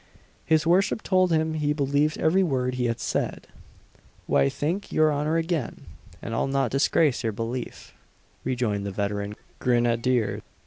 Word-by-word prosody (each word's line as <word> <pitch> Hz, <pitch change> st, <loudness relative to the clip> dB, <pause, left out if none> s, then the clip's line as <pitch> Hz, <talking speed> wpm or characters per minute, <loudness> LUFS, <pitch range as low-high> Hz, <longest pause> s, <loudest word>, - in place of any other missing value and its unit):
His 160 Hz, -1 st, +3 dB
worship 190 Hz, +6 st, +2 dB
told 185 Hz, -2 st, +2 dB
him 160 Hz, 0 st, +1 dB
he 150 Hz, -1 st, 0 dB
believed 145 Hz, +1 st, +1 dB
every 180 Hz, +5 st, +3 dB
word 130 Hz, -7 st, 0 dB
he 125 Hz, -1 st, -1 dB
had 115 Hz, -1 st, -1 dB
said. -, -, -2 dB, 0.8 s
"Why, 70 Hz, 0 st, +3 dB
thank 175 Hz, -, -3 dB
your 155 Hz, -1 st, +3 dB
honour 150 Hz, +3 st, 0 dB
again, 165 Hz, -6 st, -2 dB, 0.4 s
and 115 Hz, -, -5 dB
I'll 115 Hz, -, 0 dB
not 135 Hz, -3 st, 0 dB
disgrace 140 Hz, 0 st, +2 dB
your 110 Hz, -2 st, -1 dB
belief," 115 Hz, +4 st, -5 dB, 0.5 s
rejoined 120 Hz, -6 st, -1 dB
the 100 Hz, -, -3 dB
veteran 100 Hz, +1 st, -3 dB, 0.2 s
grenadier. 120 Hz, -1 st, +1 dB
135 Hz, 145 wpm, -25 LUFS, 115-160 Hz, 0.8 s, His